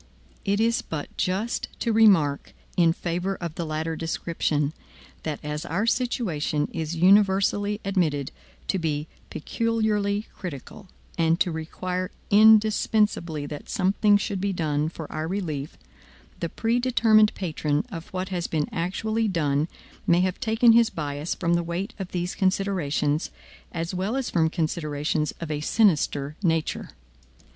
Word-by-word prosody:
It 200 0 +1
is 230 +1 +2
but 150 -3 -6
just 195 +6 -1
to 230 - +1
remark 190 -11 +4 0.2
in 170 -2 +5
favor 175 +3 -2
of 170 -4 -5
the 165 0 -4
latter 160 +1 -2
description, 160 -2 -1 0.5
that 155 -2 -4
as 150 +1 -3
our 190 +8 -1
situation 190 - 0
is 160 0 -3
universally 200 +3 +3
admitted 160 -8 0 0.4
to 190 - +1
be 155 -2 -2 0.2
peculiarly 215 +1 0
critical, 180 +3 -8 0.3
and 165 +1 +3
to 175 - +2
require 180 +3 -3 0.2
indispensably 210 -6 +4
that 145 0 -8
something 205 +2 +3
should 200 -1 -3
be 200 0 0
done 155 -4 0
for 160 -1 -7
our 155 +1 -3
relief, 160 -7 -4 0.6
the 170 - -2
predetermined 225 -1 +3
patron 155 -4 -1
of 165 0 -7
what 185 0 -4
has 175 -2 -2
been 155 -2 -1
actually 215 +6 -1
done 150 -5 +1 0.4
may 175 +1 +5
have 185 0 -1
taken 230 -1 +4
his 230 0 +5
bias 145 0 -3
from 170 -1 0
the 170 - +3
weight 175 +6 -4
of 190 -2 -5
these 175 0 -2
considerations, 180 -6 0 0.4
as 165 +1 -3
well 190 +6 -1
as 270 -2 -2
from 160 -2 +3
considerations 155 -2 -1
of 165 -2 -5
a 150 -1 -2
sinister 150 -7 +2
nature. 165 -4 0
175 Hz, 140 wpm, -25 LUFS, 155-205 Hz, 0.6 s, in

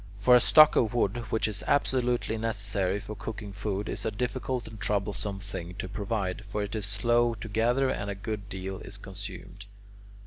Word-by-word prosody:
But 125 - +6
a 125 - +10
stock 155 +5 +7
of 115 0 +2
wood, 120 +1 +1
which 110 - +1
is 105 -1 -5
absolutely 125 -5 +1
necessary 100 -3 0
for 105 - -7
cooking 105 -1 -6
food, 100 0 -3
is - - -3
a - - +1
difficult 125 +2 -2
and 110 -1 -10
troublesome 100 0 -1
thing 90 -3 -6
to 95 - -4
provide; 100 0 -2
for 105 +1 -1
it 105 +2 -4
is 105 -2 -2
slow 120 +3 +2
to 110 0 -7
gather 120 +5 +2
and 100 - -3
a 100 - -3
good 100 0 -5
deal 95 0 -5
is - - -9
consumed. 100 +2 -8
105 Hz, 185 wpm, -29 LUFS, 100-115 Hz, -, a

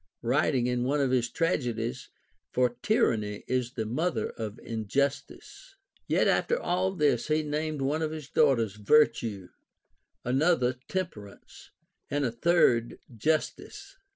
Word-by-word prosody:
writing 125 +1 +2
in 125 0 0
one 140 +4 0
of 135 -2 +1
his 120 -2 +1
tragedies, 125 -7 -2 0.2
— - - -46
For 125 -1 +2
tyranny 105 - +1
is 125 -1 -1
the 110 - -3
mother 155 +10 -1
of 110 -1 -6
injustice. 140 - -3 0.3
Yet - - +2
after 480 - +2
all 185 - 0
this, 145 -7 +1
he 155 0 +1
named 150 -1 -2
one 150 +4 0
of 155 - 0
his 155 -3 -7
daughters 115 -10 +2
\^n"tue, 105 -6 +2 0.8
another 130 0 +2
Temperance, 140 - -6 0.4
and 145 0 0
a 120 - 0
third 120 -3 +2 0.2
Justice. 155 +8 -2
130 Hz, 130 wpm, -28 LUFS, 115-155 Hz, 0.8 s, writing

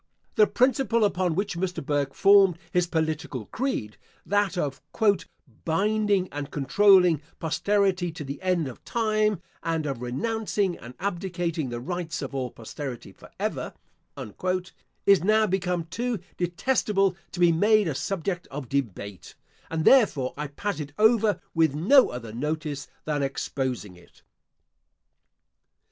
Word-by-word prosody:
The 215 - +5
principle 255 -3 +2
upon 185 -4 0
which 200 0 -1
Mr. 180 -4 -3
Burke 140 -2 -1
formed 195 -3 +6
his 180 -2 +2
political 160 -7 -2
creed, 165 - -3 0.3
that 205 -2 +1
of 140 -5 -2 0.8
"binding 200 +2 +1
and 145 0 -5
controlling 180 +1 +4 0.2
posterity 185 +1 +1
to 155 - -6
the 140 0 -6
end 180 -5 +1
of 125 - -10
time, 215 -4 0 0.2
and 165 -2 -1
of 135 -4 -3
renouncing 200 - -1
and 120 +2 -11
abdicating 175 -6 -2
the 120 0 -4
rights 165 +4 -4
of - - -6
all 130 -2 -2
posterity, 120 +2 -7
for - - -16
ever," - - -3 1.3
is 200 -3 +5
now 215 +2 +4
become 180 -3 -1
too 235 +8 -2 0.2
detestable 195 +1 +1 0.2
to 180 - -7
be 175 -1 +6
made 210 +4 +4
a 155 - -1
subject 180 +4 -3
of 135 -3 -7
debate; 100 -8 -4 0.3
and 160 -1 -2
therefore, 190 - +4
I 150 +1 -4
pass 195 +6 -4
it 145 -1 -6
over 220 -1 +4
with 160 -4 +2
no 250 - +5
other 115 -3 -7
notice 150 +2 -3 0.2
than 150 -2 -1
exposing 130 -7 -3
it. 85 - -21
175 Hz, 135 wpm, -26 LUFS, 145-200 Hz, 1.3 s, formed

